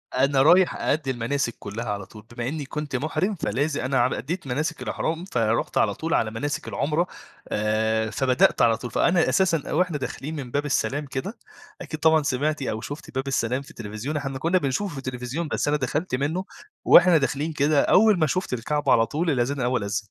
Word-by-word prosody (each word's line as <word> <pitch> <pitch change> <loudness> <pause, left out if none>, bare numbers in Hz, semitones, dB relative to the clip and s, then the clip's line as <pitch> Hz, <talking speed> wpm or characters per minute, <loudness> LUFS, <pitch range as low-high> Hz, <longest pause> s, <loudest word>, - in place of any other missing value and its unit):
أنا 135 +1 +3
رايح 175 +5 +5
أأدي 145 -3 -1
المناسِك 120 0 -2
كُلّها 110 +4 -6
على 100 -2 -3
طول، 105 +2 -14
بما 120 0 -2
إني 150 0 -3
كنت 150 -1 -5
مُحرِم 155 +9 -1
فلاز 150 -2 -1
أنا 130 0 0
ع 120 +1 +2
أديت 160 +4 -4
مناسِك 145 +5 -2
الإحرام. 165 +3 -3
فرُحت 115 - 0
على 100 -2 +3
طول 165 +7 -3
على 110 -1 +1
مناسِك 145 +6 -3
العمرة، 155 +5 0 0.4
آآ، 110 +1 0
فبدأت 130 0 +2
على 115 -2 +4
طول، 120 +1 -7
فأنا 175 0 +3
أساسًا 175 -5 +1
وإحنا 180 -4 +1
داخلين 145 +3 -5
من 130 -4 -6
باب 145 +1 -1
السلام 145 +1 0
كده، 140 - -5 0.4
أكيد 155 -2 -6
طبعًا 160 -1 +4
سمعتِ 145 +3 -1
أو 110 -4 -3
شُفتِ 145 -2 -8
باب 135 +1 -2
السلام 130 0 0
في 140 - -13
التليفزيون، 115 +7 -5
إحنا 135 -2 -4
كنا 170 +5 +2
بنشوفه 170 +6 -1
في - - -8
التليفزيون. 130 +5 -4
بس - - -1
أنا 150 0 +2
دخلت 140 +2 -2
منه، 160 +8 -2 0.4
وإحنا 180 -3 +7
داخلين 150 +2 -1
كده 145 0 +3
أول 210 -2 +4
ما 155 - +3
شُفت 185 -4 -2
الكعبة 145 +5 0
على 115 0 +5
طول، 165 +7 -1
الأذان 135 +1 0
الأول 125 -3 0
أذن. 100 +2 -2
140 Hz, 195 wpm, -24 LUFS, 125-155 Hz, 0.4 s, وإحنا